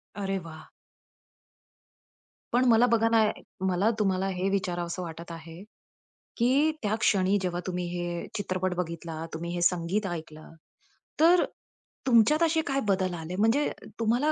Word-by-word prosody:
अरे 195 -1 -2
वाह! 165 -2 -11 1.8
पण 250 +1 +4
मला 230 +1 +6
बघा 230 -1 +3
ना, 225 -1 +4
ये 210 - -3 0.3
मला 190 +3 +2
तुम्हाला 190 -2 +1
हे 190 0 -1
विचारावसं 180 -2 -2
वाटत 170 0 -8
आहे, 165 +1 -9 0.8
की 270 +6 +3
त्या 210 +1 +1
क्षणी 195 -1 +3
जेव्हा 180 -2 -2
तुम्ही 180 -1 -2
हे 175 -1 -4
चित्रपट 185 -2 -1
बघितला, 165 -2 -4
तुम्ही 170 +2 -4
हे 175 - -2
संगीत 180 +4 +1
ऐकलं, 155 -3 -7 0.7
तर 345 +2 +6 0.6
तुमच्यात 255 +7 +5
असे 320 -1 +3
काय 275 -1 +1
बदल 185 -2 +1
आले? 165 +2 -6
म्हणजे 225 +8 +3 0.3
तुम्हाला 240 +7 +2
185 Hz, 140 wpm, -28 LUFS, 175-225 Hz, 1.8 s, मला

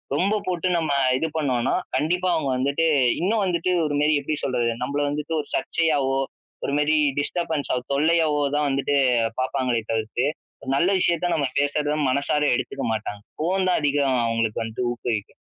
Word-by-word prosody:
ரொம்ப 200 +7 +2
போட்டு 180 0 -1
நம்ம 160 -3 -1 0.3
இது 160 - -1
பண்ணோனா, 130 -6 0 0.2
கண்டிப்பா 180 +5 0
அவுங்க 140 -4 -1
வந்துட்டு 140 +5 +1 0.4
இன்னும் 205 +3 +1
வந்துட்டு 180 0 0
ஒரு 145 -1 -1
மெரி 150 +1 +3
எப்டி 155 +2 -2
சொல்றது? 120 -3 0
நம்பள 145 +3 -1
வந்துட்டு 150 +2 -3
ஒரு - - -15
சர்ச்சையாவோ, 145 -5 +1 0.5
ஒருமாரி 150 +2 +2 0.2
டிஸ்டர்பன்ஸா 155 -3 -1 0.2
தொல்லையாவோ 155 0 +2 0.2
தான் 150 - +1
வந்துட்டு 140 +1 0 0.5
பாப்பாங்களே 130 -2 0
தவிர்த்து, 110 +3 -1 0.4
ஒரு 130 - -3
நல்ல 175 +6 +3
விஷயத்த 175 0 +1
நம்ம 145 -3 0 0.2
பேசுறத 145 +1 0 0.2
மனசார 140 +2 0
எடுத்துக்க 125 -2 -4
மாட்டாங்க. 105 -2 -4 0.2
ஃபோன் 185 +4 0
தான் - - +2
அதிகம் 140 -3 +2
அவுங்களுக்கு 115 -1 -1
வந்துட்டு 115 +2 -3
ஊக்குவிக்கும். 115 -3 -4
145 Hz, 150 wpm, -23 LUFS, 130-165 Hz, 0.5 s, மெரி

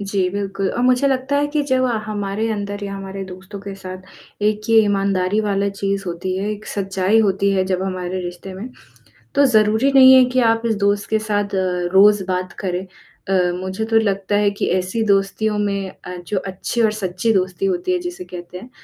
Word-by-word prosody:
जी, 195 -2 0
बिल्कुल, 195 -1 -2
और 245 - -2
मुझे 255 +2 +3
लगता 265 +1 0
है 290 0 +2
कि 295 0 -1
जब 260 -2 +1
आ 240 -3 +1
हमारे 210 +1 -2
अंदर 205 -1 -4
या 195 - -5
हमारे 195 0 -6
दोस्तों 190 +2 -10
के 200 0 -7
साथ 185 +1 -12
एक 215 +1 0
ये 225 - +6
ईमानदारी 195 0 +1
वाला 200 -1 0
चीज़ 195 0 -2
होती 180 +2 -3
है, 195 +2 -2
एक 210 0 -6
सच्चाई 195 +1 0
होती 200 -1 +1
है 190 -1 +1
जब 185 -1 -1
हमारे 185 -1 -3
रिश्ते 175 +2 -7
में, 200 +6 -7 0.7
तो 285 0 +5
ज़रूरी 220 +2 +3
नहीं 260 -1 +8
है 260 -1 +7
कि 255 0 +2
आप 225 0 -2
इस 225 -2 +1
दोस्त 200 0 0
के 220 - +2
साथ 205 -2 -2
अ, 180 -2 -1
रोज़ 205 0 +6
बात 185 -1 -2
करें। 185 0 -2 0.4
अ, - - -1 0.3
मुझे 190 +3 -3
तो 225 0 +1
लगता 200 -2 0
है 205 0 +3
कि 200 - -3
ऐसी 185 +5 -2
दोस्तियों 205 +2 +1
में 200 -2 -1
अ, 180 0 -10
जो 205 - -1
अच्छी 195 +5 -2
और 220 -1 +3
सच्ची 195 +1 -1
दोस्ती 190 - 0
होती 365 -1 -1
है 365 - +1
जिसे 355 +1 -6
कहते 180 - -9
हैं 240 +7 -12
200 Hz, 205 wpm, -20 LUFS, 190-220 Hz, 0.7 s, नहीं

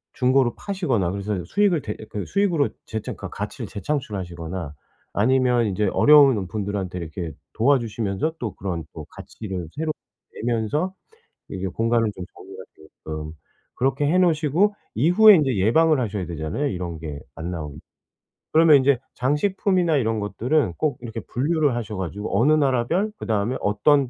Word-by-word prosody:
중고로 130 -1 +2
파시거나 140 - -1
그래서 100 -1 -3
수익을 200 -6 +2
대 105 - -5
그 105 - -4
수익으로 180 -8 +1 0.2
재창 110 -1 -5
그니까 - - -7
가치를 - - -5
재창출하시거나 95 - -4 0.4
아니면 125 +2 +3
인제 100 +1 0
어려운 135 -10 +6
분들한테 100 -3 -3
이렇게 85 0 -5 0.2
도와주시면서 115 +2 0
또 110 -5 -4
그런 90 -4 -4
또 - - -8
가치를 95 -6 -7
새롭게 155 0 -2 0.5
내면서 120 - 0 0.6
이게 95 0 -4
공간을 115 +3 +1
좀 90 - -7
정리가 - - -11
되게끔 80 0 -8 0.4
그렇게 135 +3 0
해 160 +5 +2
놓으시고 175 +3 +2 0.2
이후에 180 - +7
인제 135 -7 +1
예방을 150 +10 +4
하셔야 105 -5 -2
되잖아요, 85 - -2
이런 90 - -4
게 75 -3 -6
안 80 +3 -5
나오게. 75 -4 -6 0.8
그러면 160 -2 +7
인제 135 -2 +3 0.2
장식품이나 175 +4 +1
이런 115 -3 0
것들은 120 - 0
꼭 155 -2 0
이렇게 115 -2 -6
분류를 145 0 0
하셔 110 -4 -4
가지고 100 +3 -2
어느 145 +6 +4
나라 130 -6 +2
별 200 +5 0
그다음에 110 +3 -1
어떤 135 +6 +3
120 Hz, 370 characters per minute, -23 LUFS, 95-150 Hz, 0.8 s, 이후에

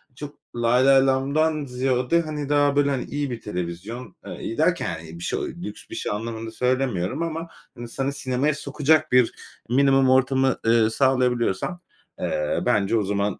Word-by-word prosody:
çok 145 +1 -9 0.2
lay 120 +2 +3
lay 135 0 +6
lamdan 145 +3 +1
ziyade, 130 +4 +1
hani, 150 -3 -5
daha, 145 -1 +3
böyle, 145 0 +3
hani, 135 -3 -1
iyi 145 -2 -3
bir 115 - -5
televizyon, 95 +4 -6
eee, - - -7
iyi - - -5
derken, - - +1 0.2
bir 85 - -8
şe - - -1
o - - -2
lüks - - -8
bir - - -7
şey - - -3
anlamında 115 +1 -4
söylemiyorum 125 - -1
ama 165 0 -4 0.3
insanı 135 +4 -3
sinemaya 135 +2 0
sokacak 150 +1 +1
bir 125 -2 +4 0.4
minimum 135 +1 +4
ortamı, 130 0 +3
ııı, 115 -1 +4
sağlayabiliyorsan, 125 - +1 0.4
eee, 75 0 -1
bence 105 +2 +2
o 110 - +1
zaman, 100 0 -1
130 Hz, 160 wpm, -24 LUFS, 115-140 Hz, 0.4 s, lay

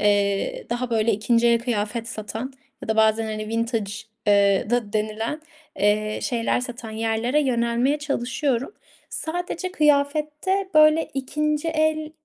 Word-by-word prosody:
eee, 205 - +1
daha 240 +1 -2
böyle 225 0 +2
2'nci 230 +3 +2
el 235 - +4
kıyafet 230 -1 -2
satan 225 +4 -5 0.3
ya - - -7
da 220 - +1
bazen, 220 0 +4
hani 215 0 -4
vintage 230 -3 -1 0.3
eee, 200 0 +3
da 240 -4 0
denilen, 220 +6 -2 0.4
eee, 215 +1 +1
şeyler 235 0 0
satan 240 -2 -6
yerlere 225 +5 0
yönelmeye 245 +2 +1
çalışıyorum. 275 - -1 0.4
Sadece 355 +2 -4
kıyafette 300 +6 +1
böyle 310 +1 +6
2'nci 300 +3 -1
el, 310 -1 0
235 Hz, 125 wpm, -23 LUFS, 220-300 Hz, 0.4 s, böyle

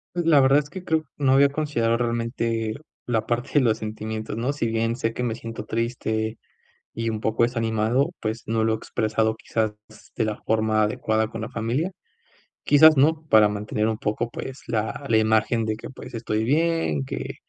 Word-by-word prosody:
Pues, 175 -2 -1
la 155 -4 +6
verdad 135 +2 +5
es 145 0 -9
que 190 -2 -8
creo 160 -2 +1
no 135 -2 +2
había 140 +1 +6
considerado 140 -6 0
realmente 115 -2 -1 0.3
la 110 -2 -1
parte 120 +3 -2
de 145 - +6
los 115 -3 +2
sentimientos, 110 0 -5
¿no? 120 +5 -1
Si 130 -6 -2
bien 115 +1 0
sé 115 -2 -2
que 125 - -3
me 115 - -1
siento 115 -2 -7
triste, 110 -1 -2 0.5
y 115 0 -3
un 110 -1 -2
poco 110 +1 +2
desanimado, 115 +4 +1
pues, 110 +1 -3
no 110 0 0
lo 110 0 +2
he - - -1
expresado, 110 0 0
quizás 110 -1 -1 0.2
s 110 -1 -18
de 115 - +1
la 105 -1 -2
forma 110 -1 +1
adecuada 110 +1 0
con 115 0 -7
la 110 - -4
familia. 125 - -2 0.7
Quizás, 155 +1 +7
¿no?, 155 +3 +3
para 110 -1 +7
mantener 105 +1 -2
un 110 - -1
poco, 110 +2 -2
pues, 130 +2 -7
la 115 +5 -2
la 115 - +3
imagen 110 +1 +2
de 110 -1 -2
que, - - -9
pues, - - -11
estoy 110 -1 -2
bien, 150 - +1
que - - -5
115 Hz, 195 wpm, -24 LUFS, 110-130 Hz, 0.7 s, Quizás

